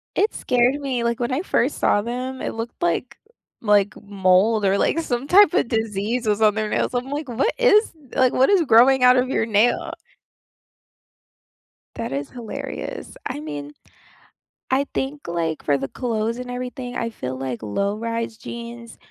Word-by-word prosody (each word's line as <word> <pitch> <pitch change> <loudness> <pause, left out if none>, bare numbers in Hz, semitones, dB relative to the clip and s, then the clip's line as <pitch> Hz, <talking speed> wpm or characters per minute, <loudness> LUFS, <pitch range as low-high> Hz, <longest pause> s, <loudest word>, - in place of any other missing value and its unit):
It 425 - +2
scared 250 +2 +2
me, 260 -4 -2
like, 235 0 -1
when 240 0 -1
I 265 - 0
first 380 - 0
saw 205 - +2
them, 255 +3 -4
it - - -3
looked 225 +1 -6
like 175 +8 -1 0.4
like 205 -3 +3
mold 200 +2 +2
or, 195 +1 +3
like, 330 - +1
some 255 -4 -2
type 395 +2 +6
of 240 - +2
disease 220 +1 -1
was 210 0 +1
on 215 -1 +5
their 215 -1 -2
nails. - - -1
I'm 250 +2 -2
like, 290 +1 -4
"What 250 - 0
is 465 -3 +4 0.2
like, 255 -1 +4
what 265 - +4
is 390 - +5
growing 255 0 +5
out 250 0 +7
of 255 +1 +1
your 225 - +1
nail?" 220 +2 +2 2.0
That 230 - -4
is 140 +1 -3
hilarious. 235 -3 -7
I - - -4
mean, 145 -1 -7 1.0
I 275 +2 +2
think, 285 +2 -3
like, 165 -2 -2
for 145 -1 +2
the 135 0 -4
clothes 230 - -2
and 250 0 -7
everything, 250 0 -5
I 230 - -2
feel 130 - -6
like 130 -3 -4
low-rise 220 - -2
jeans 235 0 -9
235 Hz, 170 wpm, -22 LUFS, 205-255 Hz, 2.0 s, out